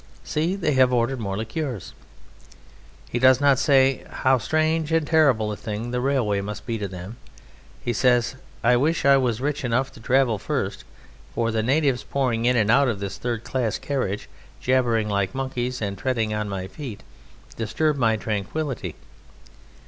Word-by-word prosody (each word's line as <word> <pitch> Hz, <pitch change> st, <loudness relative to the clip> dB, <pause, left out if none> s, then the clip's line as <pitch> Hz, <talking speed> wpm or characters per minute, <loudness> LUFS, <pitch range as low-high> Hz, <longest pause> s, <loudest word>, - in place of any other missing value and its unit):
See, 165 Hz, +5 st, -1 dB
they 175 Hz, -6 st, 0 dB
have 130 Hz, -2 st, +4 dB
ordered 125 Hz, +2 st, +1 dB
more 100 Hz, -3 st, -3 dB
liqueurs!" 115 Hz, -, -4 dB, 1.2 s
He 120 Hz, -, -1 dB
does 130 Hz, 0 st, +6 dB
not 140 Hz, -2 st, +4 dB
say: 135 Hz, -2 st, +3 dB
"How 130 Hz, 0 st, +2 dB
strange 155 Hz, +5 st, 0 dB
and 160 Hz, -1 st, +2 dB
terrible 135 Hz, -9 st, +3 dB
a -, -, -3 dB
thing 110 Hz, +3 st, -5 dB
the 125 Hz, 0 st, -1 dB
railway 125 Hz, -7 st, +1 dB
must 105 Hz, +1 st, -6 dB
be 115 Hz, -2 st, -3 dB
to 100 Hz, -, -2 dB
them!" 95 Hz, +4 st, -8 dB, 0.7 s
He 120 Hz, -, -1 dB
says: 120 Hz, 0 st, +2 dB, 0.3 s
"I 120 Hz, +1 st, +5 dB
wish 155 Hz, +5 st, +1 dB
I 140 Hz, 0 st, +7 dB
was 120 Hz, -4 st, 0 dB
rich 145 Hz, 0 st, -2 dB
enough 125 Hz, +2 st, 0 dB
to -, -, -14 dB
travel 120 Hz, -2 st, +2 dB
first, -, -, -3 dB, 0.5 s
for 115 Hz, 0 st, 0 dB
the 110 Hz, 0 st, 0 dB
natives 135 Hz, +2 st, +1 dB
pouring 125 Hz, -4 st, -1 dB
in 125 Hz, +1 st, +3 dB
and 110 Hz, -1 st, +3 dB
out 140 Hz, +3 st, +5 dB
of 115 Hz, -5 st, -1 dB
this 100 Hz, -1 st, -5 dB
third 120 Hz, -2 st, -3 dB
class 125 Hz, -5 st, -1 dB
carriage, 125 Hz, -8 st, -3 dB, 0.3 s
jabbering 120 Hz, -4 st, +1 dB
like 100 Hz, +2 st, -1 dB
monkeys, 125 Hz, -2 st, -3 dB
and 100 Hz, -1 st, -2 dB
treading 115 Hz, -3 st, -1 dB
on 105 Hz, -1 st, -2 dB
my 95 Hz, -2 st, -4 dB
feet, 115 Hz, 0 st, -8 dB, 0.5 s
disturb 115 Hz, +8 st, 0 dB
my 115 Hz, -5 st, +2 dB
tranquillity. 110 Hz, +7 st, -3 dB
125 Hz, 170 wpm, -24 LUFS, 110-135 Hz, 1.2 s, I